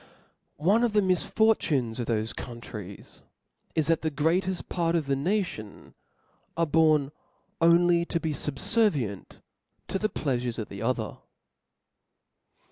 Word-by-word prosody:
One 200 Hz, +10 st, +3 dB
of 235 Hz, -3 st, +1 dB
the 210 Hz, -, +4 dB
misfortunes 180 Hz, -, +1 dB
of 120 Hz, -, -3 dB
thofe 110 Hz, -1 st, -1 dB
countries 105 Hz, -5 st, -9 dB, 0.5 s
is, 160 Hz, -, +2 dB
that 165 Hz, +1 st, +2 dB
the 160 Hz, -, 0 dB
greateft 175 Hz, +5 st, 0 dB
part 170 Hz, -1 st, 0 dB
of 160 Hz, -3 st, +1 dB
the 135 Hz, 0 st, +1 dB
nation 160 Hz, -, -3 dB, 0.6 s
are 170 Hz, -, +3 dB
born 155 Hz, -2 st, +3 dB, 0.5 s
only 170 Hz, +1 st, +5 dB
to 170 Hz, -, -1 dB
be 160 Hz, -1 st, -2 dB
fubfervient 145 Hz, -, -1 dB, 0.5 s
to 195 Hz, -, -1 dB
the 215 Hz, -, 0 dB
pleafurcs 125 Hz, -, -2 dB
of 110 Hz, -, -5 dB
the 100 Hz, 0 st, -8 dB
other. 115 Hz, -2 st, -2 dB
155 Hz, 125 wpm, -27 LUFS, 120-175 Hz, 0.6 s, only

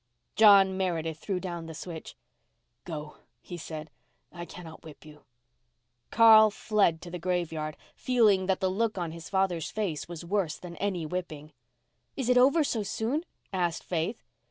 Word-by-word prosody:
John 195 Hz, -3 st, +6 dB
Meredith 165 Hz, -4 st, -2 dB
threw 190 Hz, +1 st, -2 dB
down 175 Hz, -2 st, -6 dB
the 160 Hz, -, -8 dB
switch. 165 Hz, 0 st, -8 dB, 0.7 s
"Go," 150 Hz, -3 st, -7 dB, 0.2 s
he 175 Hz, -, -9 dB
said, 155 Hz, -2 st, -7 dB, 0.4 s
"I 175 Hz, -1 st, -7 dB
cannot 165 Hz, -2 st, -11 dB
whip 155 Hz, -1 st, -13 dB
you." 150 Hz, -1 st, -15 dB, 0.8 s
Carl 220 Hz, -1 st, +7 dB
fled 200 Hz, -6 st, +1 dB
to 175 Hz, -, -9 dB
the 180 Hz, -, -5 dB
graveyard, 165 Hz, -4 st, -2 dB, 0.2 s
feeling 215 Hz, -7 st, +2 dB
that 190 Hz, -1 st, 0 dB
the 190 Hz, -1 st, +1 dB
look 215 Hz, +2 st, -1 dB
on 170 Hz, -3 st, -3 dB
his 165 Hz, 0 st, -9 dB
father's 190 Hz, -4 st, 0 dB
face 195 Hz, -9 st, -3 dB
was 170 Hz, -1 st, -7 dB
worse 180 Hz, -4 st, -1 dB
than 175 Hz, -1 st, -10 dB
any 190 Hz, -5 st, -2 dB
whipping. 155 Hz, -3 st, -6 dB, 0.6 s
"Is 260 Hz, -3 st, -2 dB
it 250 Hz, -, +5 dB
over 280 Hz, +5 st, +5 dB
so 235 Hz, -6 st, -1 dB
soon?" 230 Hz, -, -2 dB, 0.3 s
asked 175 Hz, -3 st, -1 dB
Faith. 175 Hz, +6 st, -3 dB
180 Hz, 155 wpm, -28 LUFS, 165-205 Hz, 0.8 s, Carl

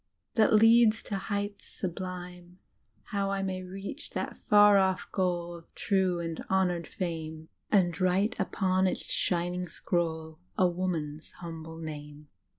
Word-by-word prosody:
That 220 Hz, -1 st, +4 dB
leads 225 Hz, 0 st, +6 dB
to 205 Hz, -, -4 dB
heights 205 Hz, +1 st, -3 dB
sublime; 180 Hz, -1 st, -6 dB, 0.5 s
How 200 Hz, -1 st, -2 dB
I 195 Hz, 0 st, -1 dB
may 185 Hz, -1 st, -2 dB
reach 195 Hz, -, -7 dB
that -, -, -3 dB
far 205 Hz, -1 st, +6 dB
off 190 Hz, -1 st, +1 dB
goal 175 Hz, -2 st, 0 dB
Of 165 Hz, -1 st, -15 dB
true 190 Hz, -3 st, +1 dB
and 165 Hz, -1 st, -4 dB
honoured 180 Hz, -3 st, +1 dB
fame. 160 Hz, -3 st, -5 dB, 0.2 s
And 185 Hz, -3 st, +3 dB
write 195 Hz, +6 st, +2 dB
upon 185 Hz, -1 st, +1 dB
its -, -, -2 dB
shining 175 Hz, 0 st, -1 dB
scroll 160 Hz, -2 st, -2 dB, 0.2 s
A 185 Hz, -, +5 dB
woman's 170 Hz, -4 st, -3 dB
humble 160 Hz, -1 st, -8 dB
name." 150 Hz, -2 st, -8 dB
180 Hz, 135 wpm, -29 LUFS, 170-195 Hz, 0.5 s, leads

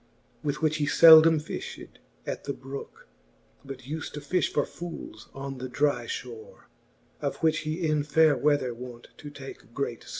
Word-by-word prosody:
With 150 Hz, +2 st, -3 dB
which 155 Hz, 0 st, +2 dB
he 145 Hz, -2 st, 0 dB
leldome 160 Hz, +1 st, +8 dB
fifhed 150 Hz, -, -8 dB, 0.3 s
at -, -, -5 dB
the 140 Hz, -, -2 dB
brooke> 135 Hz, +1 st, -9 dB, 0.6 s
But 135 Hz, -2 st, -9 dB
ulH 155 Hz, +5 st, -5 dB
to 150 Hz, -, -5 dB
fifh 150 Hz, +3 st, 0 dB
for 145 Hz, -, +1 dB
fooles 165 Hz, -10 st, -9 dB
on 135 Hz, -1 st, -6 dB
the 130 Hz, 0 st, -5 dB
dry 145 Hz, +3 st, +1 dB
fhore, 455 Hz, +2 st, -8 dB, 0.6 s
Of -, -, -2 dB
which 155 Hz, -1 st, +3 dB
he 155 Hz, +3 st, -3 dB
in 155 Hz, -1 st, +1 dB
faire 150 Hz, +1 st, +4 dB
weather 145 Hz, -3 st, +1 dB
wont 120 Hz, 0 st, -10 dB
to 150 Hz, -, -9 dB
take 135 Hz, -4 st, -11 dB
great 130 Hz, -4 st, -3 dB
(lore. -, -, -13 dB
145 Hz, 170 wpm, -27 LUFS, 135-160 Hz, 0.6 s, leldome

